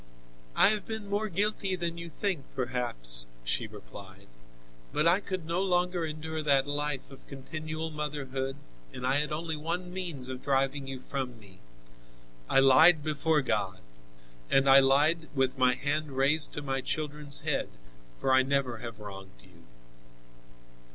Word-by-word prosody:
"I - - +7
have 215 -1 +1
been 220 -2 -5
more 205 +2 -1
guilty 200 0 -1
than 170 -1 -4
you 170 0 -7
think 175 -2 -3
perhaps," 115 - +2 0.2
she - - -1
replied, 95 +10 -13 0.6
"but 150 +2 +1
I 175 +3 +5
could 185 -4 -5
no 170 +3 -1
longer 180 -2 0
endure 155 +1 -5
that 140 -3 +3
life 145 -1 -2
of 135 - -15
continual 155 +3 -6
motherhood, 135 -3 -4 0.4
and 125 - -6
I 130 +2 +2
had 150 +1 -1
only 160 +1 -3
one 175 +4 -4
means 170 -9 -3
of 130 0 -6
driving 135 0 0
you 135 -1 -6
from 130 -3 -5
me. 95 -3 -17 0.9
I - - +5
lied 150 +4 +7
before 155 0 +1
God 100 -6 -1 0.7
and 135 0 +3
I 135 0 +9
lied, 150 +5 +3
with 130 -1 0
my 125 -1 +4
hand 145 +2 -2
raised 145 +3 +3
to 150 - -5
my 135 -1 -2
children's 150 0 -2
head, - - -1 0.5
for 130 - +1
I 130 - +6
never 135 -3 -1
have 115 -2 -8
wronged 95 - -11
you." - - -20
145 Hz, 155 wpm, -29 LUFS, 130-160 Hz, 0.9 s, I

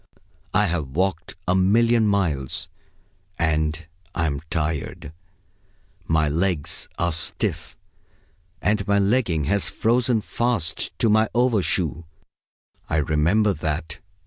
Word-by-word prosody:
I 105 +2 +3
have 85 -5 -1
walked 90 -3 -1
a 90 - +3
million 110 +4 +3
miles, 85 -7 0 0.7
and 80 0 0 0.3
I'm 75 -4 -1
tired. 75 -2 -3 0.9
My 80 -1 +2
legs 85 0 -1
are 85 0 +1
stiff, 80 - -1 0.9
and 105 -1 +1
my 100 0 +3
legging 100 -6 +1
has 100 +7 +1
frozen 120 0 +1
fast 105 -10 -2
to - - +2
my 110 0 +3
overshoe; 95 - +1 0.8
I - - 0
remember 80 +8 +2
that. 80 0 -4
90 Hz, 105 wpm, -23 LUFS, 80-105 Hz, 0.9 s, I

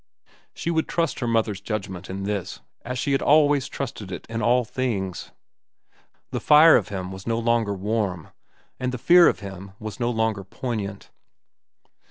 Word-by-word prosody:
She 170 - -2
would 160 -1 0
trust 165 -3 -1
her 120 - -2
mother's 110 -3 0
judgment 95 -4 -5
in 95 +1 -5
this 100 -1 -3 0.2
as 125 +1 -4
she 140 - -1
had 135 - +2
always 145 -2 +4
trusted 125 -9 -6
it 90 - -6
in 115 0 -4
all 120 +2 +3
things. 110 -7 -3 1.0
The - - -2
fire 155 +2 +7
of - - +2
him 95 -2 -5
was 95 +2 -9
no 115 0 +1
longer 115 -3 +1
warm, 100 -4 -2 0.5
and 125 0 -1
the 125 - -4
fear 175 +7 +6
of - - +1
him 95 -1 -9
was 110 +2 -7
no 120 -1 0
longer 110 -4 0
poignant. 100 -1 -5
115 Hz, 170 wpm, -24 LUFS, 100-125 Hz, 1.0 s, fire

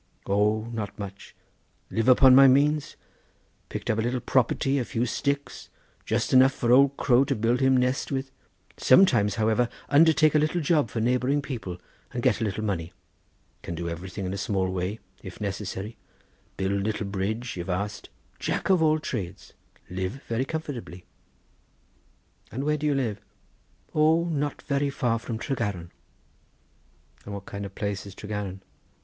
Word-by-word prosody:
"O, 105 +2 +2
not 110 -3 -5
much; 100 -1 -9 0.6
live 115 +1 0
upon 130 +1 +7
my 135 +1 +9
means; 145 +3 +3 0.7
picked - - -6
up 110 - +1
a - - +2
little 120 +2 -1
property, 135 +3 +1
a - - 0
few 115 +1 -1
sticks, 140 +3 -3 0.4
just - - 0
enough 130 +1 +6
for 120 -2 0
old 140 +2 +5
crow 125 -1 +4
to 140 - -1
build 115 +3 +1
him 130 -1 +4
nest 125 +3 0
with—sometimes, 130 - +2
however, 110 +2 +2 0.2
undertake 155 +1 +5
a 155 - +4
little 155 +4 +1
job 150 -5 +2
for 115 - -3
neighbouring 125 +4 +1
people 120 -11 -5 0.3
and - - -4
get - - +2
a - - +1
little 105 0 -2
money. 85 -6 -3 0.7
Can 85 - -5
do 85 +1 -4
everything 90 +4 -6
in 95 +1 -3
small 95 -1 0
way, 95 +3 -2 0.2
if 95 - -10
necessary; 105 +1 -4 0.6
build 95 +1 0
little 105 +1 -2
bridge, 105 +5 -3
if 90 +1 -6
asked;—Jack 100 - -3
of 185 -3 +4
all 155 -1 +4
Trades—live 95 - -6
very 115 +3 -1
comfortably." 135 - -6 1.5
"And 130 +4 -3
where 150 +1 +1
do 150 +1 -1
you 145 - +2
live?" 115 -7 -2 0.7
"O, 160 +2 +4
not 150 -4 -2
very 140 -1 0
far 120 -4 0
from 115 -1 -5
Tregaron." 105 -9 -3 1.3
"And 100 - -7
what 100 0 -8
kind 100 0 -6
of 100 - -16
place 100 -1 -3
is 100 - -11
Tregaron?" 105 -3 -5
115 Hz, 155 wpm, -26 LUFS, 100-135 Hz, 1.5 s, my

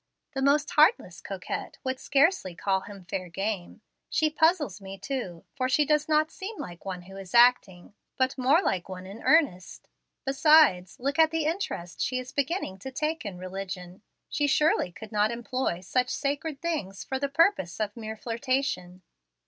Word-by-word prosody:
The 270 - -2
most 290 +2 +3
heartless 310 +10 +3
coquette - - -5
would 260 -1 -2
scarcely 280 - +2
call 190 +2 +1
him 195 -2 -11
fair 185 0 -4
game. 195 0 -4 0.3
She 310 -1 +2
puzzles 315 - +2
me 195 0 -8
too, 195 -6 -5
for 255 -2 -1
she 295 +3 +3
does 300 +1 +1
not 310 +1 +3
seem 405 +3 -7
like 175 +1 -8
one 185 -2 -5
who 195 +2 -12
is 195 +2 -7
acting, 235 -7 +4 0.2
but 260 0 +1
more 275 +8 +3
like 180 0 -1
one 185 0 -7
in 200 +4 -10
earnest. 280 - +1 0.4
Besides, 270 - +4
look 280 +5 -2
at 320 -1 +7
the 325 -1 -1
interest 310 - -3
she 255 - 0
is 255 0 -5
beginning 280 - -2
to 265 - -6
take 305 +2 -2
in 190 -3 -6
religion. 185 0 -7 0.3
She 290 -2 0
surely 300 - +2
could 220 +5 -11
not 210 0 +2
employ 240 -5 -2
such 250 +7 0
sacred 285 +1 -3
things 205 - -3
for 265 - -3
the 280 0 -1
purposes 280 - +2
of 210 -1 -2
mere 220 -1 -6
flirtation." 230 -7 -2
250 Hz, 175 wpm, -27 LUFS, 190-300 Hz, 0.4 s, at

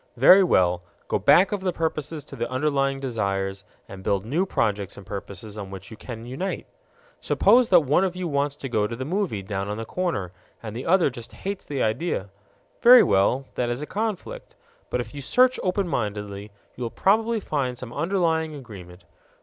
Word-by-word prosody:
Very 190 +1 +8
well, 90 - +3 0.3
go - - 0
back 185 +3 +5
of 205 -2 -2
the 185 -1 0
purposes 160 -2 -3
to - - -10
the 120 - -3
underlying 135 0 0
desires, 100 -6 -2 0.2
and 95 -1 -10
build 100 +1 0
new 165 - 0
projects 105 - -1
and 100 - -11
purposes 100 +2 -7
on 100 -2 -6
which 95 +2 -10
you - - -8
can 115 +1 -8
unite. 140 +11 -4 0.5
Suppose 245 -1 +4
that 175 -3 +7
one 150 +5 +2
of 185 -2 -1
you 180 -1 -3
wants 140 -1 0
to 140 - -6
go 105 -4 +1
to 115 - -5
the 130 +3 -5
movie 175 - -2
down 95 0 -3
on 105 - -3
the 115 - -5
corner 165 - -2 0.3
and 110 -1 -6
the 125 - -5
other 175 -4 +4
just 120 -2 -10
hates 195 0 -5
the 140 -3 -2
idea. 110 - -1 0.5
Very 245 +1 +9
well; 100 +7 +2
that 120 -1 -1
is 120 +4 -3
a - - -3
conflict. 215 +2 -4 0.3
But 125 - -1
if 120 - -9
you 145 - -6
search 255 - +3
open 190 +1 0
mindedly, 105 -6 -3 0.3
you - - -11
will 120 - -1
probably 220 - +2
find 135 -9 -2
some 125 -1 -7
underlying 165 -3 0
agreement. 95 -9 -11
130 Hz, 195 wpm, -24 LUFS, -, 0.5 s, Very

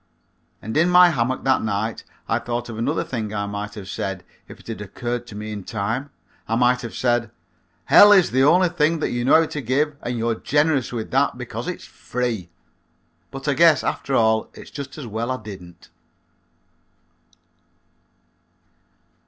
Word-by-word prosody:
And 110 - -5
in 170 +3 +4
my 180 0 +7
hammock 130 -2 -1
that 130 -1 +2
night 110 +1 -2 0.2
I - - +1
thought 120 0 -4
of 110 -1 -6
another 140 +7 0
thing 110 -5 -4
I 100 0 -1
might 105 +1 -5
have 100 -3 -8
said 95 0 -4 0.2
if - - -12
it - - -18
had 115 -2 -6
occurred 120 +4 -4
to 105 - -10
me 105 +1 -6
in 105 -2 -6
time. 115 +8 -3 0.4
I 115 - 0
might 125 +1 +3
have 115 - -7
said, 120 -2 +1 0.6
"Hell 205 - +8
is 190 -4 +5
the 130 +2 +2
only 180 +5 +5
thing 165 -1 +1
you 120 0 -1
know 145 +5 +6
how - - +1
to 150 -1 -5
give 140 +5 0
and 120 0 -3
you're 115 0 0
generous 145 +2 +1
with 115 -3 -5
that - - +1
because - - -6
it's - - -5
free." 120 -7 -4 0.8
But 135 +1 -8
I 145 - +3
guess 155 0 +5
after 135 - -2
all 110 -2 +2
it's - - -12
just 140 0 -8
as 150 - -7
well 115 +2 -4
I 130 - -1
didn't. 95 -6 -12
120 Hz, 175 wpm, -22 LUFS, 110-140 Hz, 0.8 s, Hell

